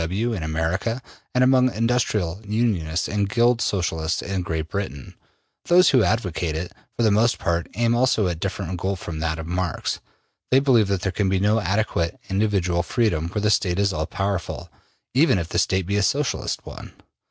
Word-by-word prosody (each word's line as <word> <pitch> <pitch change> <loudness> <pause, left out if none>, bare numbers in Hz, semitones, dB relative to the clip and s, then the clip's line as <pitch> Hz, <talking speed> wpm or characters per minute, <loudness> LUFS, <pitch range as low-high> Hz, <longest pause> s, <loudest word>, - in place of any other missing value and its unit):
W. 95 +8 -1
W. - - -1
in 95 - -4
America, 80 +9 -1 0.4
and 125 - +4
among 130 0 +4
Industrial 110 -6 0
Unionists 100 -7 0
and 100 -1 -1
Guild 120 +1 +3
Socialists 80 -4 -1
in 95 -1 -2
Great 80 -2 -3
Britain. 90 -8 -5 0.5
Those 180 0 +5
who 130 -4 +5
advocate 90 -6 -1
it, 85 +3 -4 0.3
for 120 - +1
the 110 - +4
most 115 +4 +3
part, 85 0 -1
aim 120 +1 +2
also 120 -3 +2
at 90 - +1
a 80 - -5
different 95 -2 -3
goal 95 +2 -1
from 85 -3 -6
that 80 0 -1
of 80 - -6
Marx. 90 0 -2 0.5
They 130 - +5
believe 125 -7 +4
that 100 -2 -1
there 95 0 -1
can 95 +1 0
be 95 0 +1
no 105 +3 +3
adequate 95 -4 -1
individual 95 -4 +1
freedom 85 -5 0
where 105 +3 -3
the 105 - +3
State 90 -4 +1
is 100 -1 +1
all 80 -2 -2
powerful, 95 -3 -3 0.4
even 135 -3 +4
if 85 -2 -3
the 85 - 0
State 95 -1 +1
be 100 +3 0
a - - +2
Socialist 140 +6 -1
one. - - -10
100 Hz, 195 wpm, -23 LUFS, 85-115 Hz, 0.5 s, Those